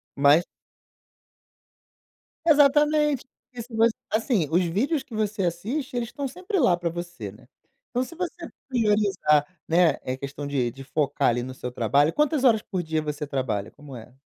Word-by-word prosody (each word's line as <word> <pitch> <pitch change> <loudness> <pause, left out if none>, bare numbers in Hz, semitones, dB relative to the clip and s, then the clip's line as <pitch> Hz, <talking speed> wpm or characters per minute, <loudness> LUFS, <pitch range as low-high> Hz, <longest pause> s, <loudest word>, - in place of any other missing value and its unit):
Mas 145 +5 +5 2.0
Exatamente, 295 -2 +4
porque 250 -1 -12
se 235 0 -16
você 225 0 +4 0.2
assim, 220 - +1
os 175 +2 +3
vídeos 250 - 0
que 250 - -15
você 210 -2 -1
assiste 230 - -3
eles 235 -1 -2
estão 280 -1 -4
sempre 365 - -3
lá 190 -10 +4
para 175 -1 -2
você, 170 - -6
né, 120 +4 -18 0.4
então 250 +1 0
se 335 - -10
você 350 -1 -5 0.2
priorizar 205 - +2 0.2
né, 165 -1 +4
é 130 - -2
questão 140 +1 -6
de 130 -4 0
de 135 +2 -11
focar 140 0 +1
ali 120 +1 0
no 130 0 -6
seu 125 -1 -6
trabalho 140 +7 +2
quantas 300 -2 +1
horas 225 -4 +5
por 185 -3 -3
dia 160 -1 -1
você 150 0 -4
trabalha, 120 -8 -2
como 145 -3 -12
é? 120 +3 -12
180 Hz, 170 wpm, -25 LUFS, -, 2.0 s, Mas